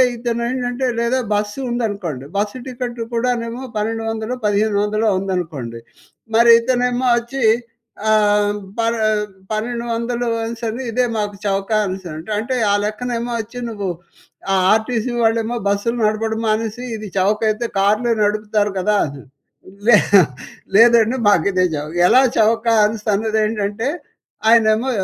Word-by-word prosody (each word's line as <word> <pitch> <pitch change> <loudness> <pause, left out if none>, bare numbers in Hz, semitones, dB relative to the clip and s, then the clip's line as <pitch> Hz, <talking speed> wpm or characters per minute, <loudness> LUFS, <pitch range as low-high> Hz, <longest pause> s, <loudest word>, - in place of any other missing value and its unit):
ఇతనేంటంటే 245 +2 -2
లేదా 235 +2 +1
బస్సు 210 +4 -2
ఉందనుకోండి. 200 - -3
Bus 205 +4 -1
ticket 245 -2 -5
కూడానేమో 235 +1 -1
పన్నెండు 225 +2 -2
వందలో, 225 +3 -3
పదిహేను 205 0 +1
వందలో 215 +1 +1
ఉందనుకోండి. 160 -12 -4 0.6
మరి 235 +1 +7
ఇతనేమో 250 +1 0
వచ్చి 240 +2 -5 0.7
ఆహ్, 205 -1 +3 0.2
పన్ 230 0 +1 0.6
పన్నెండు 235 +2 -2
వందలు 235 +1 -2 0.2
అనిసని 230 +1 -4
ఇదే 250 +3 +1
మాకు 205 -1 -2
చవక 195 +1 -1
అనిసని 185 -3 -5
అంటే, 170 +7 -8
అంటే 250 +4 -2 0.2
ఆ - - +3
లెక్కనేమో 235 +2 -3
వచ్చి 230 +3 -9
నువ్వు 205 -4 -4 0.6
ఆ - - +3 0.2
ఆర్టీసీ 225 +2 0
వాళ్ళేమో 225 +1 +1
బస్సులు 205 +4 0
నడపడం 220 +1 -1
మానిసి, 220 +1 -1
ఇది 215 -1 -7
చవకయితే 215 +4 +1
కార్లే 215 +5 +2
నడుపుతారు 210 0 +1
కదా! 210 +3 +1
అని. 140 -2 -8 0.7
లే 225 -3 +8 0.8
లేదండి 230 +2 +5
మాకిదే 185 -1 +3
చవక. 150 +2 -5
ఎలా 255 +6 +6 0.2
చవక 225 +2 +2 0.2
అనిసి 215 0 -3
అన్నదేంటంటే, 215 +1 -1 0.6
ఆయనేమో 225 +2 +4
220 Hz, 120 wpm, -19 LUFS, 205-235 Hz, 0.8 s, లే